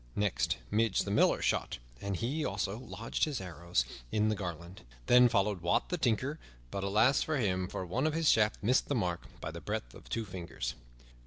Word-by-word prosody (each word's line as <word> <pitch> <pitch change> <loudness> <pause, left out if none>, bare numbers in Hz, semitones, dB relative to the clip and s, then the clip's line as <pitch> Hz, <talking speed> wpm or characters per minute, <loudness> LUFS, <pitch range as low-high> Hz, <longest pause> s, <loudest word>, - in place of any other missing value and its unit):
Next 105 -2 +1
Midge, 110 -2 +2
the - - -3
Miller, - - +3
shot, - - 0 0.2
and 100 -1 -2
he, 135 - -1
also, 100 0 -2
lodged 115 -2 -2
his 145 -5 -3
arrows 85 -7 -1 0.3
in 105 0 +2
the 110 - +1
garland. 85 -1 -6 0.2
Then 125 0 +7
followed 100 -4 +1
Wat, 85 0 +1
the 180 - 0
Tinker, 130 +4 0 0.3
but 100 - -3
alas 110 +7 +4
for 155 -1 0
him! 95 -6 0
For 95 - -4
one 125 - 0
of 155 - 0
his 165 -1 +1
shafts 105 -4 +4
missed 125 +5 +3
the 145 - 0
mark 90 -7 -1
by - - -5
the - - -8
breadth - - -4
of - - -14
two 115 -1 -2
fingers. 90 -3 -5
105 Hz, 195 wpm, -32 LUFS, 95-125 Hz, 0.3 s, Then